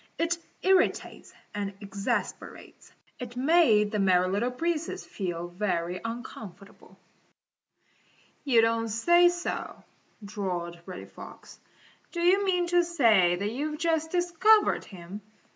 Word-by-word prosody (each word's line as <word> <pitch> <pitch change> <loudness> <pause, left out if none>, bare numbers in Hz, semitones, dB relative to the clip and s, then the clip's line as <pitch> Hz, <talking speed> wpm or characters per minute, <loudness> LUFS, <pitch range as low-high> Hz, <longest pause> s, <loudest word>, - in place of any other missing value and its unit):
It 335 +1 0 0.2
irritates 380 0 +1 0.2
and 200 -1 -4
exasperates. 200 -1 -5 0.3
It 245 -1 -7
made 255 -8 +4
the 210 - -1
Merry 185 -2 +3
Little 205 +6 0
Breezes 325 +5 -3
feel 175 -3 -5
very 180 -1 -2
uncomfortable. 225 -4 -9 1.5
"You 250 -6 +4
don't 230 0 +1
say 345 +11 +4
so," 350 0 -5 0.4
drawled 180 -4 -4
Reddy 185 -1 -8
Fox. - - -13 0.5
"Do 345 - -4
you 365 +4 +3
mean 360 -2 +1
to 350 0 +4
say 225 - +3
that 200 +4 -3
you've 300 +5 -3
just 320 -1 0
discovered 360 +5 +3
him? 185 +2 -10
230 Hz, 115 wpm, -27 LUFS, -, 1.5 s, made